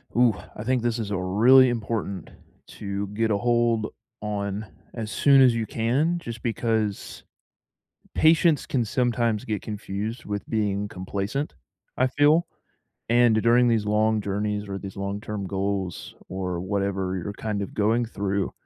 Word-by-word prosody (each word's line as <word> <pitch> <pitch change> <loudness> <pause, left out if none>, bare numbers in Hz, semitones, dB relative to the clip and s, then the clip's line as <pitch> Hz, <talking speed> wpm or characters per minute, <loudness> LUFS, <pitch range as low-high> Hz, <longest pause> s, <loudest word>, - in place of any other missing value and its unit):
Ooh, 120 -4 +4 0.2
I 105 - -5
think 125 0 +1
this 120 -1 0
is 105 -2 -4
a 100 - 0
really 115 +8 +5
important 110 -5 -3 0.4
to 100 0 -4
get 110 +3 -1
a 100 - +2
hold 120 -1 +2 0.3
on 105 0 -3 0.3
as 110 -3 -5
soon 135 +1 +5
as 125 -3 +6
you 115 -1 -1
can 130 - 0
just 115 -7 -7
because, 110 -3 -2 0.9
patience 160 -1 +4
can 125 -4 0
sometimes 115 -2 0
get 105 -3 -2
confused 105 +2 -5
with 105 -1 -4
being 105 -2 -1
complacent, 100 +10 -3 0.4
I 130 - +2
feel. 150 +5 +3 0.6
And 120 -2 +4
during 120 +2 +4
these 115 -3 +2
long 110 +1 +2
journeys 105 +1 -2
or 100 0 -4
these 95 -1 -8
long-term 100 +1 -4
goals 95 -1 -3
or 90 -2 -3
whatever 95 0 -1
you're 100 - -5
kind 105 -1 -3
of 100 - -6
going 110 +3 +2
through, 100 -3 -2
105 Hz, 150 wpm, -25 LUFS, 100-120 Hz, 0.9 s, as